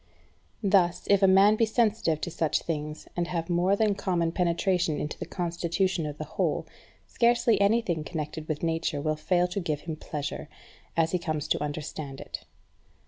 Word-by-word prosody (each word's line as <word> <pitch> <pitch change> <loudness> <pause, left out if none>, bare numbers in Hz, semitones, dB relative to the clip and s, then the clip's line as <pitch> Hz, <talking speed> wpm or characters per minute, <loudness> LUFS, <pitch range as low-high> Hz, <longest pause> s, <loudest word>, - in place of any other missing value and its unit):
Thus, 185 -3 +3
if 200 -1 +5
a 195 - +6
man 195 +3 +6
be 225 - +4
sensitive 220 -8 +1
to 175 - -3
such 160 -2 0
things, 150 -2 -4
and 175 -1 -1
have 170 0 -3
a - - +2
more 180 +3 +3
than 210 0 +2
common 175 -4 0
penetration 175 -2 +1
into 150 - -3
the - - -5
constitution 175 0 -1
of 145 0 -6
the 155 - -4
whole, - - -1 0.4
scarce 240 +1 +2
anything 200 -5 +3
connected 155 -1 -5
with 155 0 -3
Nature 165 -2 0
will 155 +1 0
fail 175 +3 +1
to 180 - -2
give 155 -5 -2
him 160 -2 -5
pleasure, 150 -2 -5 0.5
as 165 -1 +3
he 180 - +1
comes 155 -3 -2
to - - +1
understand 145 -2 -5
it. - - -7
170 Hz, 180 wpm, -28 LUFS, 155-195 Hz, 0.5 s, a